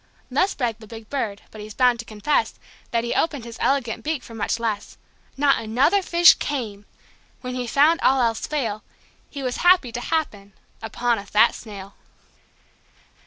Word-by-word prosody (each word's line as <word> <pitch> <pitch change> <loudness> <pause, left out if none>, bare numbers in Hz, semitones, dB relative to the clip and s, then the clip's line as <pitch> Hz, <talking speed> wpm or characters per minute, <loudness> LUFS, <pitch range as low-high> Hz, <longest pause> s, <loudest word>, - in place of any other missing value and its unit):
Thus 370 +10 +1
bragged 235 -4 -2
the 220 - -13
big 225 0 -11
Bird. 220 -8 -3
But 215 - -10
he's 210 0 -9
bound 250 -2 +3
to 230 - -6
confess 215 +8 -1 0.3
That 230 -1 0
he 235 - -2
opened 290 -7 -1
his 235 0 -10
elegant 265 -5 0
beak 305 -3 -2
for 230 - -12
much 225 +1 -2
less. 220 -3 -3 0.4
Not 275 -2 +3
another 260 - +2
fish 345 -1 +6
came. 215 -8 -5 0.5
When 250 -1 -5
he 250 -1 -3
found 295 +7 +4
all 265 0 +3
else 230 -2 0
fail, 230 -8 -3 0.5
He 280 -1 -7
was 250 -1 -2
happy 355 -9 +4
to 245 - -5
happen 210 -11 -3 0.3
upon 235 +1 -1
a 200 - -9
fat 215 +4 +4
snail. 200 -3 -10
240 Hz, 170 wpm, -23 LUFS, 220-280 Hz, 0.5 s, fish